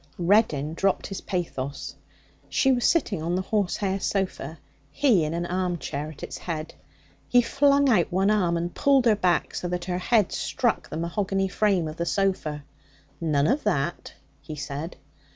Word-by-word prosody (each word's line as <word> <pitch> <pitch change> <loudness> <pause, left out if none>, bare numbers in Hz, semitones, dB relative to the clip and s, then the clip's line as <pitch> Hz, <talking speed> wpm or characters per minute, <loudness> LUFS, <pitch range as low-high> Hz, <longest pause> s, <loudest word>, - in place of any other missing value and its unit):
Reddin 170 -6 +2
dropped 195 +3 0
his 195 - -5
pathos. 150 -7 -4 0.6
She 270 - +3
was 245 -2 +1
sitting 225 - +2
on 170 +2 -1
the 185 - -1
horsehair 195 -1 0
sofa, 185 -7 -2 0.3
he 210 - +3
in 155 +2 -2
an 170 0 -2
armchair 175 -5 -2
at 155 - -11
its - - -6
head. 160 -2 -5 0.5
He 245 -1 +4
flung 280 +3 +3
out 210 -10 +3
one 190 +3 +2
arm 180 -5 +2
and 170 +1 -3
pulled 275 -3 +3
her 225 -2 +5
back 180 -3 +1
so 180 - -3
that 175 0 -3
her 180 0 -2
head 210 +1 +2
struck - - -1
the - - -5
mahogany 195 +3 -1
frame 190 -4 +1
of 155 +1 -7
the 170 - -2
sofa. 175 -7 -1 0.6
'None 150 -4 +1
of 265 - +1
that!' 170 -5 -1 0.3
he 155 - -8
said. 145 +3 -5
180 Hz, 170 wpm, -25 LUFS, 160-210 Hz, 0.6 s, her